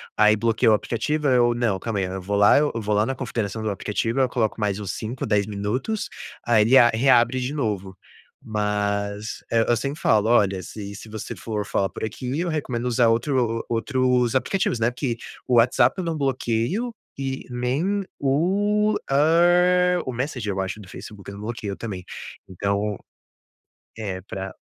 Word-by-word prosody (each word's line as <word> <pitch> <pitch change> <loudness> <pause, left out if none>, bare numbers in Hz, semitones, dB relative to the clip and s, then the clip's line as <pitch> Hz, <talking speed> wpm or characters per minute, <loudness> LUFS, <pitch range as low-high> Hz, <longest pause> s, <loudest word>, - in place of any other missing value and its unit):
aí 105 0 +5
bloquei 115 +2 +2
o - - +6
aplicativo, 145 +8 -1
aí 130 -2 +4
eu 120 -1 +3
não, 115 -6 0
calma 115 0 -3
aí, 95 - 0
eu 95 +1 -5
vou 100 +3 -2
lá 105 +7 +6
eu 150 - +1
vou 105 -2 -1
lá 105 +1 +3
na 135 0 -2
configuração 115 -4 -3
do 110 - -1
aplicativo, 115 +5 -2
eu 130 -1 +3
coloco 115 -3 -1
mais 105 -1 0
uns 100 -3 -4
5, 120 +5 -4
10 105 -3 +1
minutos, 110 - -2 0.4
aí 115 -2 +4
ele 125 +5 +5
a 120 - +7
reabre 120 +1 +3
de 125 +2 -2
novo, 100 -8 -3 0.5
mas, 105 -1 -2
eh, 115 -1 +3
eu 120 - +4
sempre 140 +6 -4
falo: 110 0 +3
"Olha, 100 -5 +3
se 100 +1 -8
se 110 +3 -10
você 110 -1 -6
for 105 -2 -4
falar 95 0 0
por - - -8
aqui, 125 +6 -3
eu 180 - -1
recomendo 125 -6 -2
usar 120 -1 +3
outro 115 -1 +1
outros 125 +1 +1
aplicativos." 130 -1 +1
Né, 115 +2 +2
porque 125 -2 -3 0.3
o 125 - +2
WhatsApp 120 +1 +4
eu 185 - -2
não 165 -1 -1
bloqueio 135 - -1 0.2
e 135 -1 -4
nem 140 +12 -1 0.2
o, 205 +9 +2
hã, 175 +4 +4
o 130 - -3
Messenger 125 -4 -3
eu 95 - -4
acho 95 +3 -4
do 95 - -13
Facebook 100 -1 -10
eu 100 - -8
não 105 - -8
bloqueio 110 -3 -4
também, 100 -6 -6 0.5
então, 100 +2 -1 1.0
é 95 -4 -4
pra 95 0 -6
115 Hz, 180 wpm, -23 LUFS, 105-135 Hz, 1.0 s, a